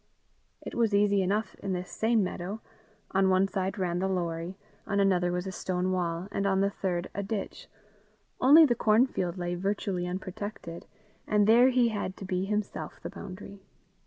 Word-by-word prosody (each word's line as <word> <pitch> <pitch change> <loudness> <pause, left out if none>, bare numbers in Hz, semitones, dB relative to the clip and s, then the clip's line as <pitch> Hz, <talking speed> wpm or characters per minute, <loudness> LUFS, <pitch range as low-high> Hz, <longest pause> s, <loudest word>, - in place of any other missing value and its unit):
It - - -7
was 225 -3 +2
easy 200 -1 +3
enough 200 +2 -1
in 195 -1 -3
this 180 0 -4
same 225 -1 +2
meadow: 185 +3 -4 0.5
on 190 0 +3
one 190 +1 +3
side 190 0 -2
ran 180 -2 -1
the 190 - 0
Lorrie; 175 -1 -3 0.3
on 200 -1 0
another 180 -3 +2
was 180 +1 -2
a 190 - -4
stone 185 0 -2
wall; 175 -1 -2
and 200 - -1
on 190 -1 +2
the 200 0 +2
third 180 -3 -2
a 200 - -2
ditch; 200 0 -5 0.7
only 300 +5 +8
the 255 - +3
cornfield 215 -6 +2
lay 175 0 -2
virtually 185 -1 -2
unprotected, 185 -1 -6 0.4
and 210 -1 +3
there 235 +4 +6
he 250 -2 +3
had 205 -3 -4
to 195 - -7
be 185 0 -1
himself 210 0 -3
the - - -5
boundary. 195 +1 -9
195 Hz, 175 wpm, -29 LUFS, 180-210 Hz, 0.7 s, only